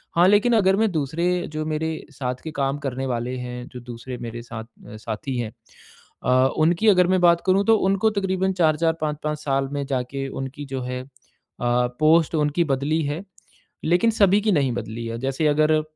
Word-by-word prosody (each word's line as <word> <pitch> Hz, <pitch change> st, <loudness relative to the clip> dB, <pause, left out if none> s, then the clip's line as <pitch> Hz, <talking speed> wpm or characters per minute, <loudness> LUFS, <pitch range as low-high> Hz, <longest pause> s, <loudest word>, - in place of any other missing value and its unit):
हाँ, 175 Hz, +2 st, +6 dB
लेकिन 205 Hz, +4 st, +4 dB
अगर 190 Hz, -2 st, +4 dB
मैं 220 Hz, -1 st, +2 dB
दूसरे 160 Hz, +1 st, -1 dB, 0.3 s
जो 155 Hz, 0 st, -3 dB
मेरे 155 Hz, +1 st, -1 dB, 0.2 s
साथ 125 Hz, -2 st, -3 dB
के 160 Hz, -, -5 dB
काम 140 Hz, -1 st, -1 dB
करने 130 Hz, +1 st, -3 dB
वाले 125 Hz, 0 st, -2 dB
हैं, 125 Hz, 0 st, -6 dB
जो 125 Hz, -, -7 dB
दूसरे 120 Hz, +1 st, -8 dB
मेरे 115 Hz, 0 st, -6 dB
साथ 110 Hz, -2 st, -7 dB, 0.2 s
अ, -, -, -10 dB
साथी 110 Hz, +4 st, -4 dB
हैं, 115 Hz, -3 st, -3 dB, 0.7 s
अ, 130 Hz, +1 st, +4 dB
उनकी 170 Hz, +7 st, +3 dB
अगर 180 Hz, -3 st, +6 dB
मैं 185 Hz, 0 st, +3 dB
बात 170 Hz, -1 st, +5 dB
करूँ 190 Hz, +2 st, +3 dB
तो -, -, +6 dB
उनको 195 Hz, +3 st, +2 dB
तकरीबन 190 Hz, 0 st, 0 dB
4-4 160 Hz, +1 st, +3 dB
5-5 150 Hz, 0 st, -2 dB
साल 135 Hz, -2 st, -1 dB
में 145 Hz, -1 st, -2 dB
जाके 135 Hz, 0 st, -3 dB, 0.2 s
उनकी 135 Hz, +2 st, -6 dB
जो 130 Hz, -, -2 dB
है 125 Hz, 0 st, -4 dB
अ, 130 Hz, -, -14 dB, 0.6 s
पोस्ट 125 Hz, +7 st, +2 dB
उनकी 150 Hz, +2 st, +1 dB
बदली 145 Hz, +2 st, 0 dB
है, 150 Hz, +6 st, -3 dB, 0.6 s
लेकिन 175 Hz, +8 st, +3 dB
सभी 205 Hz, -2 st, +4 dB
की 215 Hz, 0 st, +1 dB
नहीं 140 Hz, -5 st, +2 dB
बदली 110 Hz, +2 st, -7 dB
है। 115 Hz, 0 st, -4 dB
जैसे 135 Hz, +4 st, 0 dB
अगर 155 Hz, +1 st, +3 dB
150 Hz, 190 wpm, -23 LUFS, 125-170 Hz, 0.7 s, हाँ